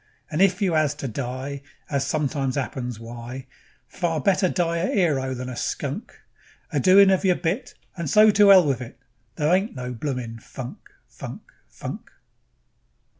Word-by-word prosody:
And 155 Hz, +3 st, 0 dB
if 195 Hz, 0 st, +3 dB
you 180 Hz, -4 st, +2 dB
'as 150 Hz, -2 st, +2 dB
to 140 Hz, -, -5 dB
die, 130 Hz, +3 st, -5 dB, 0.3 s
As 140 Hz, -2 st, 0 dB
it -, -, -4 dB
sometimes 140 Hz, -3 st, -1 dB
'appens, 125 Hz, -3 st, -3 dB
why, 120 Hz, +3 st, -8 dB, 0.4 s
Far 165 Hz, -3 st, -2 dB
better 185 Hz, +4 st, +2 dB
die 170 Hz, -2 st, 0 dB
a 170 Hz, +3 st, 0 dB
'ero 140 Hz, -9 st, +1 dB
than 125 Hz, 0 st, -5 dB
a 125 Hz, -, -5 dB
skunk; -, -, -4 dB, 0.5 s
A 145 Hz, -, +2 dB
doin' 195 Hz, +6 st, +7 dB
of 190 Hz, -, +2 dB
yer 185 Hz, -2 st, +4 dB
bit, 200 Hz, +12 st, -3 dB, 0.2 s
And 170 Hz, -5 st, -3 dB
so 215 Hz, +7 st, +7 dB
to 205 Hz, 0 st, +6 dB
'ell 185 Hz, -3 st, +8 dB
with 135 Hz, -3 st, 0 dB
it, 120 Hz, -, -9 dB, 0.4 s
There 150 Hz, +3 st, +2 dB
ain't 195 Hz, 0 st, +1 dB
no 125 Hz, -1 st, -5 dB
bloomin' 120 Hz, -2 st, -4 dB
funk, 125 Hz, +2 st, -8 dB, 0.3 s
funk, -, -, -9 dB, 0.2 s
funk. -, -, -8 dB
145 Hz, 170 wpm, -24 LUFS, 130-185 Hz, 0.5 s, ell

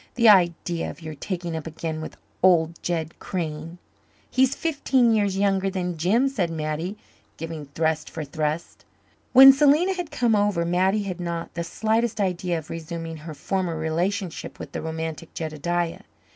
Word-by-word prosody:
The 235 Hz, -3 st, +6 dB
idea 175 Hz, -3 st, +3 dB
of -, -, -10 dB
your 160 Hz, 0 st, -6 dB
taking 175 Hz, +2 st, -4 dB
up 160 Hz, 0 st, -5 dB
again 160 Hz, 0 st, -4 dB
with 155 Hz, -, -8 dB, 0.2 s
old 170 Hz, -3 st, +3 dB
Jed 165 Hz, -2 st, -3 dB
Crane!" 165 Hz, -2 st, -4 dB, 0.5 s
"He's 265 Hz, +1 st, +3 dB
fifteen 270 Hz, -7 st, +2 dB
years 205 Hz, -3 st, +1 dB
younger 195 Hz, -1 st, +2 dB
than 180 Hz, -2 st, -2 dB
Jim," 200 Hz, -, +2 dB
said 200 Hz, -11 st, -1 dB
Mattie, 160 Hz, +4 st, -3 dB, 0.4 s
giving 160 Hz, -2 st, -6 dB
thrust 160 Hz, -1 st, 0 dB
for 160 Hz, -, -5 dB
thrust. 155 Hz, +2 st, -3 dB, 0.5 s
When 270 Hz, +1 st, +10 dB
Selena 300 Hz, +7 st, +4 dB
had 355 Hz, -4 st, -4 dB
come 235 Hz, -6 st, +2 dB
over 205 Hz, -5 st, +1 dB
Mattie 190 Hz, +4 st, +2 dB
had 185 Hz, -3 st, -5 dB
not 170 Hz, -1 st, -4 dB
the 170 Hz, -, -3 dB
slightest 220 Hz, +5 st, 0 dB
idea 180 Hz, -3 st, 0 dB
of 155 Hz, -1 st, -8 dB
resuming 165 Hz, 0 st, -5 dB
her 155 Hz, 0 st, -8 dB
former 180 Hz, 0 st, -2 dB
relationship 170 Hz, +3 st, -2 dB
with -, -, -8 dB
the -, -, -4 dB
romantic 160 Hz, 0 st, -5 dB
Jedediah. 165 Hz, +2 st, -2 dB
175 Hz, 160 wpm, -24 LUFS, 160-205 Hz, 0.5 s, When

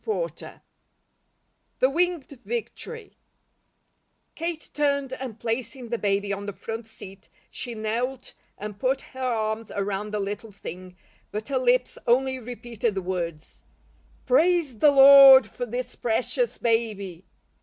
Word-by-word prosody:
CHAPTER 435 Hz, -, -1 dB
XXVI -, -, -6 dB, 1.2 s
THE 260 Hz, -, +3 dB
WINGED 330 Hz, -5 st, -1 dB
VICTORY 465 Hz, -1 st, -6 dB, 1.2 s
KATE 330 Hz, -1 st, -5 dB
turned 280 Hz, -2 st, 0 dB
and 255 Hz, -4 st, -6 dB
placing 235 Hz, +1 st, -4 dB
the 235 Hz, -1 st, -2 dB
baby 200 Hz, 0 st, 0 dB
on 200 Hz, +1 st, -5 dB
the 205 Hz, -, -4 dB
front 225 Hz, +3 st, -6 dB
seat, 195 Hz, -3 st, -12 dB, 0.2 s
she 240 Hz, -2 st, -6 dB
knelt 240 Hz, +4 st, -3 dB, 0.2 s
and 210 Hz, 0 st, -7 dB
put 265 Hz, +1 st, 0 dB
her 260 Hz, -, -14 dB
arms 225 Hz, -3 st, -1 dB
around 200 Hz, +1 st, -3 dB
the 210 Hz, -, -2 dB
little 205 Hz, +2 st, -5 dB
thing, 185 Hz, -1 st, -9 dB, 0.4 s
but 215 Hz, +5 st, -5 dB
her 265 Hz, -2 st, +1 dB
lips 250 Hz, 0 st, +1 dB
only 260 Hz, +2 st, +2 dB
repeated 235 Hz, -2 st, -4 dB
the 190 Hz, -, -2 dB
words: 170 Hz, -4 st, -5 dB, 0.6 s
"Praise 345 Hz, -, +2 dB
the 295 Hz, -, +7 dB
Lord 275 Hz, -2 st, +9 dB
for 245 Hz, +3 st, -6 dB
this 245 Hz, +2 st, -5 dB
precious 245 Hz, -, -1 dB
baby!" 210 Hz, -6 st, -1 dB
240 Hz, 135 wpm, -25 LUFS, 210-270 Hz, 1.2 s, Lord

